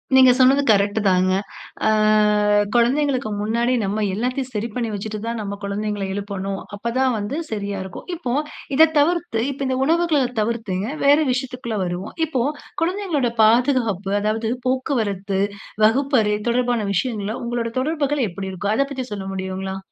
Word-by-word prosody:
நீங்க 260 -1 +8
சொன்னது 265 +2 +5
கரெக்ட் 205 0 +3
தாங்க. 185 0 +3 0.6
ஆ - - +5 0.9
குழந்தைகளுக்கு 260 +1 +2
முன்னாடி 235 +4 +1
நம்ப 200 +2 -1
எல்லாத்தையும் 255 +5 -2
சரி 215 +1 -2
பண்ணி 235 -2 -1
வச்சுட்டு 210 +1 -4
தான், 230 0 -2
நம்ப 200 -1 -4
குழந்தைகள 205 0 -2
எழுப்பணும். 195 -1 -4 0.2
அப்ப 230 +3 -3
தான் 260 -1 +3
வந்து 210 +7 -3
சரியா 200 -2 -3
இருக்கும். 190 -1 -9
இப்ப 255 -8 -3 0.4
இத 320 +3 +7
தவிர்த்து 330 -6 +1
இப்போ 275 0 -5
இந்த 260 0 0
உணவுகள்ல 330 -1 +2 0.2
தவிர்த்து 220 -3 -2 0.3
வேற 285 +1 +7
விஷயத்துக்குள்ள 250 -3 -3
வருவோம். 175 +3 -5
இப்போ 275 -6 -1 0.4
குழந்தைகளோட 345 -8 0
பாதுகாப்பு 225 -4 +2
அதாவது 220 +2 -1 0.2
போக்குவரத்து, 220 - -1 0.5
வகுப்பறை, 225 -3 +2
தொடர்பான 245 0 +1 0.2
விஷயங்கள 205 +1 -1
உங்களுடைய 235 -1 -2
தொடர்புகள் 290 -1 0
எப்படி 190 +2 -6
இருக்கும்? 200 +3 -2
அதை 275 - +2
பத்தி 260 -2 -4
சொல்ல 200 -2 -5
முடியுங்களா? 190 0 -4
230 Hz, 140 wpm, -21 LUFS, 200-265 Hz, 0.9 s, நீங்க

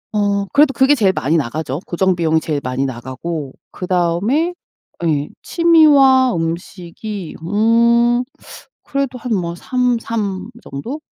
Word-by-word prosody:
어 200 -1 +1
그래도 285 -1 +5
그게 265 +2 +4
제일 205 -8 +3
많이 155 0 0
나가죠, 140 +1 -3
고정 185 +1 +1
비용이 160 -2 +1
제일 150 -2 -3
많이 130 +2 -2
나가고 130 +4 -5 0.2
그다음에 185 - 0 0.5
예. 150 -2 0
취미와 285 - +5
음식이 175 +3 -5
음 235 +5 +3 0.6
그래도 275 -2 -3
한 240 0 -4
뭐 170 -4 -1
3, 250 +4 0
3 205 -5 -4 0.2
정도? 240 - -6
195 Hz, 235 characters per minute, -18 LUFS, 165-250 Hz, 0.6 s, 그래도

